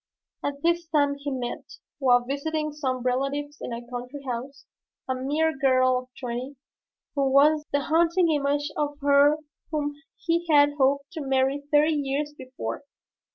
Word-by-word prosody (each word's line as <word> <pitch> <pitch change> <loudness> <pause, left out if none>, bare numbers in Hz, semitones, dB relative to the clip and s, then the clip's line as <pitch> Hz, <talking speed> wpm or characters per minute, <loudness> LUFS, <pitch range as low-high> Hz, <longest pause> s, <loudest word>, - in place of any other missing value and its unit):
At 285 0 -4
this 340 0 +1
time 290 -3 +2
he 285 0 -4
met, 250 -3 -5 0.3
while 250 -3 +5
visiting 305 +3 -2
some 260 -4 -3
relatives 275 +3 -1
in - - -5
a 235 +1 -5
country 250 +3 -7
house, 255 +3 -5 0.4
a 260 - 0
mere 295 +5 0
girl 255 -2 +3
of 255 0 -12
twenty, 250 +2 -4 0.6
who 275 -2 +1
was 300 +2 +4
the 285 - +3
image, 285 - -2
the - - -3
haunting 340 +1 +4
image 290 0 0
of 290 -1 -2
her 285 +1 +5 0.3
whom 290 -2 -1 0.2
he 340 +1 -1
had 290 -1 +6
hoped 280 +2 +2
to 325 -3 -6
marry 270 +1 +1
thirty 300 +2 +4
years 290 0 -1
before. 260 +1 -6
285 Hz, 160 wpm, -26 LUFS, 265-300 Hz, 0.6 s, had